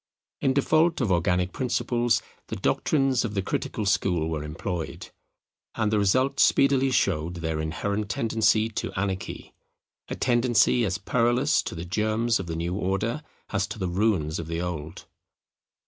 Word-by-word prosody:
In 135 -2 +2
default 155 +3 +3
of 115 -7 0
organic 90 +1 +1
principles 120 -2 0 0.2
the - - -4
doctrines 135 -4 +1
of 110 -3 -4
the 100 - 0
critical 105 - -3
school 90 -5 +1
were 75 -2 -3
employed: 80 +2 -5 0.6
and 110 -2 0
the 105 - +3
result 130 +8 +2
speedily 135 -1 +4
showed 85 -9 0
their 80 -2 -3
inherent 100 +6 -2
tendency 110 0 +2
to 110 - -4
anarchy; 95 -1 -4 0.5
a - - -4
tendency 120 -1 +3
as 95 -1 -1
perilous 120 +1 +2
to - - -6
the 85 +1 -6
germs 110 +4 0
of 95 - -5
the 80 - -4
new 85 +2 -2
order 100 +8 -1 0.3
as 100 -1 0
to 110 - -7
the 95 -3 -2
ruins 90 -5 0
of 80 - -5
the 85 0 -3
old. 85 -2 -5
100 Hz, 155 wpm, -26 LUFS, 90-120 Hz, 0.6 s, speedily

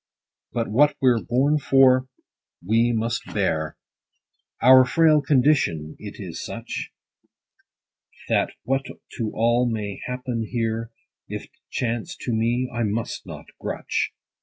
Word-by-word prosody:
But 115 -1 -1
what 145 +8 +4
we're 125 -4 +3
born 140 +5 +2
for, 130 -2 +4 0.6
we 115 +4 +3
must 115 0 -1
bear: 80 -7 0 0.8
Our 130 +2 +8
frail 155 +3 +4
condition 130 - +2
it - - -8
is - - -6
such, - - -6 1.4
That - - +2
what 135 +3 0 0.3
to 110 -3 -2
all 120 +2 +2
may 105 -3 -4
happen 125 -3 -3
here, 115 -1 -2 0.4
If't - - -6 0.2
chance 120 -2 -3
to 120 - -2
me, 120 +3 +1
I 120 - -2
must 110 +1 -2
not - - -8 0.2
grutch. - - -2
120 Hz, 120 wpm, -24 LUFS, 110-130 Hz, 1.4 s, Our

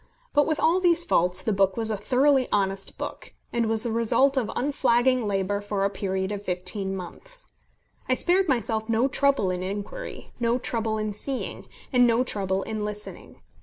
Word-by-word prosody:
But 290 -1 +4
with 310 -1 0
all 340 +3 +3
these 345 -2 +4
faults 180 - +2
the 220 - +1
book 195 0 +2
was 225 -1 +1
a - - 0
thoroughly 265 +4 +3
honest 195 -1 -1
book, - - -7 0.2
and 235 -1 +1
was 220 0 0
the 235 - -1
result 235 +5 +3
of 255 -5 0
unflagging 255 -3 +2
labour 200 0 0
for 205 -1 -1
a 200 - 0
period 190 -1 -2
of 205 -1 -4
fifteen 190 +1 -2
months. - - -7 0.6
I 255 - +4
spared 365 +6 +3
myself 220 -3 0
no 230 +3 +3
trouble 275 -8 +2
in 180 0 -3
inquiry, 205 - -6
no 235 0 +2
trouble 225 -3 -2
in 215 -1 -2
seeing, 265 +6 -4 0.3
and 245 -1 +6
no 235 +1 +3
trouble 195 -5 -1
in 215 -1 -4
listening. 210 0 -7
220 Hz, 180 wpm, -26 LUFS, 195-260 Hz, 0.6 s, and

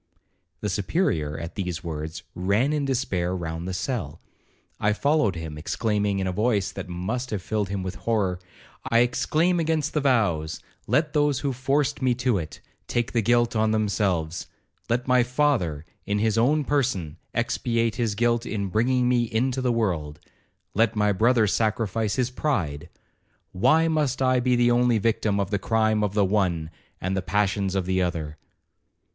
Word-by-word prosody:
The 105 - -1
Superior, 90 - 0
at 85 +1 -6
these 90 -3 -4
words, 80 0 -5
ran 100 +11 +1
in 150 -2 0
despair 100 -10 -1
round 85 -1 -4
the - - -2
cell. 95 - -3 0.6
I 105 0 +2
followed 140 - +2
him, 80 -2 -6
exclaiming, 105 +3 0
in 95 - -1
a 95 - 0
voice 105 0 +1
that - - -7
must 110 +9 -3
have 100 -4 -3
filled 105 -2 -1
him 100 -1 -3
with 95 0 -4
horror, 100 -6 0 0.5
'I 115 - +3
exclaim 155 +8 +2
against 160 -2 0
the 150 - +1
vows—let 115 - 0
those 145 -2 +2
who 140 -2 -1
forced 135 +3 0
me 125 -2 +2
to 120 -4 +1
it, 80 - -8 0.3
take 120 -1 -1
the 115 - +1
guilt 120 +2 +2
on 110 0 +2
themselves—let 100 +3 -2
my 125 -1 +5
father, 120 - 0 0.2
in 100 +1 0
his 110 0 +1
own 140 +7 +3
person, 125 - -1 0.2
expiate 115 -2 0
his 115 -4 0
guilt 120 +1 +1
in 100 -4 -3
bringing 125 +5 +2
me 120 -1 +3
into 130 +3 0
the 125 -1 +1
world—let 90 +2 -2
my 105 -1 +2
brother 115 +3 +3
sacrifice 110 0 0
his 125 -1 0
pride—why 125 - -1
must 150 -5 0
I 130 -1 +3
be 125 0 +2
the 120 0 +3
only 120 -1 +3
victim 110 -2 +1
of 100 0 -2
the 100 - +1
crime 110 0 +1
of 100 -1 -1
the 105 -2 +4
one, 90 -5 0 0.3
and 95 +1 -2
the 95 - 0
passions 100 0 0
of 95 -2 0
the 95 +1 +1
other?' 80 -4 -2
110 Hz, 165 wpm, -25 LUFS, 95-125 Hz, 0.6 s, my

